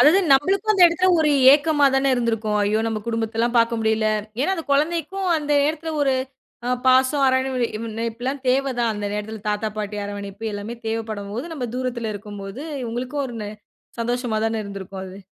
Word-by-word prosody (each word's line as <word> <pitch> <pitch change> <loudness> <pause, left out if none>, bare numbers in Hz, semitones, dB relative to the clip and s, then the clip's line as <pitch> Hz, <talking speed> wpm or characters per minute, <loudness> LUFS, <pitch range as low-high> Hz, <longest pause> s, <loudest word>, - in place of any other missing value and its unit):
அதாது 310 +6 +7
நம்மளுக்கு 385 +10 +3
அந்த 390 -3 +4
இடத்துல 345 +2 +2
ஒரு 310 -1 +3 0.2
ஏக்கமாதான 285 -3 +3
இருந்திருக்கும். 225 -3 0
ஐயோ! 210 +2 +1
நம்ம 225 -1 -1
குடும்பத்தல்லாம் 230 +1 -1
பாக்க 230 0 +3
முடியல. 220 0 +1 0.3
ஏன்னா 375 +8 +2
அந்த 330 -3 -5
குழந்தைக்கும் 335 +6 0
அந்த 295 -1 -1
நேரத்துல 315 +2 -1
ஒரு 270 -2 +2 0.5
அ - - -1 0.2
பாசம், 260 +2 +4
அரராவணைப்புல்லா 240 -2 -1 0.2
தேவ 270 +2 +2 0.2
தான். 235 -1 +2
அந்த 205 0 -3
நேரத்துல 210 +1 -5
தாத்தா, 210 +1 0
பாட்டி 210 0 -3
அரவணைப்பு 200 +1 -7
எல்லாமே 205 +3 -5
தேவப்படும்போது, 220 +2 -4
நம்ம 255 -5 -3
தூரத்துல 240 -4 -2
இருக்கும்போது 205 +3 -7 0.3
உங்களுக்கு 250 +4 -4
ஒரு 245 -3 -6
ந - - -5 0.5
சந்தோஷமா 240 -1 -1
தான 225 -1 -1
இருந்திருக்கும். 195 -1 -7
அது. 190 +1 -10
235 Hz, 155 wpm, -22 LUFS, 215-280 Hz, 0.5 s, அதாது